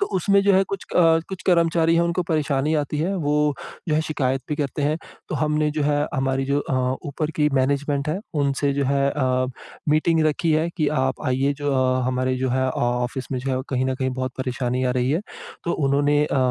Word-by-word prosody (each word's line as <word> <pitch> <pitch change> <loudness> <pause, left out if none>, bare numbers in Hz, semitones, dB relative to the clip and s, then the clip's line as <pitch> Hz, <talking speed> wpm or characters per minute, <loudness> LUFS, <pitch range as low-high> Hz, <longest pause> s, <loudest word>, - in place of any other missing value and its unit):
तो 400 - +2
उसमें 200 +2 +3
जो 200 - +4
है 190 - +5
कुछ 195 - -4
अ, - - +6 0.3
कुछ 190 -1 -7
कर्मचारी 165 -2 +3
हैं 170 - +3
उनको 170 +1 0
परेशानी 150 -1 +1
आती 150 0 -1
है 180 +6 0
वो 150 -3 +1 0.3
जो 155 - +2
है 155 - +3
शिकायत 135 -4 -1
भी 150 - -1
करते 145 0 -2
हैं। 150 +2 +1 0.3
तो - - -3
हमने 150 0 +1
जो 150 0 -2
है 145 0 +2 0.2
हमारी 135 0 0
जो 140 +1 +1
अ, 135 - -3 0.3
ऊपर 150 +2 -2
की 150 -1 +3
मैनेजमेंट 140 +2 0
है 160 +5 -1 0.2
उनसे 140 0 +1
जो 140 0 0
है 140 +1 +2
अ, 130 -3 0 0.4
मीटिंग 155 +2 +3
रखी 155 +2 +1
है 160 +2 +2
कि 155 -4 +1
आप 130 0 -1
आइए 135 +2 +1
जो 145 - 0
अ, 130 0 +2
हमारे 130 0 0
जो 130 0 -1
है 130 +1 +1
ऑफ़िस 125 +1 -2
में 130 - -1
जो 135 +2 -3
है - - -1
कहीं 130 -1 0
न 130 - 0
कहीं 130 0 -1
बहुत 130 0 -3
परेशानी 125 -1 -1
आ 125 - +2
रही 125 +2 +1
है। 160 - +1 0.4
तो 170 - 0
उन्होंने 145 +1 +2
अ, 140 - -1
145 Hz, 220 wpm, -23 LUFS, 130-155 Hz, 0.4 s, अ